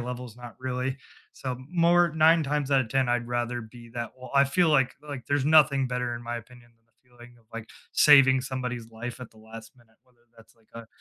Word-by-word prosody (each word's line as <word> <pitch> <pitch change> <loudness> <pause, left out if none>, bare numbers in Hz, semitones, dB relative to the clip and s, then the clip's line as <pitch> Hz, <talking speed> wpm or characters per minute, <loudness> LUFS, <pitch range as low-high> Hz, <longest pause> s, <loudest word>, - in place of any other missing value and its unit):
levels, 125 -1 -7
not 120 -1 -11
really. 130 +1 -3 0.4
So, 130 -2 -5
more 175 0 +3
9 160 +1 +4
times 145 -1 -2
outta 130 -4 +2
10 130 +1 0
I'd 120 0 -1
rather 120 0 -2
be 115 +1 -13
that 120 0 -5
well, 130 -1 -11
I 140 - +6
feel, 165 +5 +2
like 135 -4 +2
like, 140 -4 -7
there's 140 -1 0
nothing 145 -3 +4
better, 125 -1 -3
in 120 - -10
my 120 0 -4
opinion, 120 +1 -14
than 115 - -41
the 115 +3 -38
feeling 120 0 -17
of, 115 - -27
like, 115 -1 -7 0.2
saving 135 -3 +6
somebody's 125 -3 -5
life 120 +2 -8
at 125 - -9
the 110 - -21
last 110 0 -12
minute, 115 -2 -26
whether 125 -2 -33 0.2
that's, 115 0 -20
like, 110 -1 -31
a 115 -1 -9
125 Hz, 220 wpm, -26 LUFS, 120-135 Hz, 0.4 s, I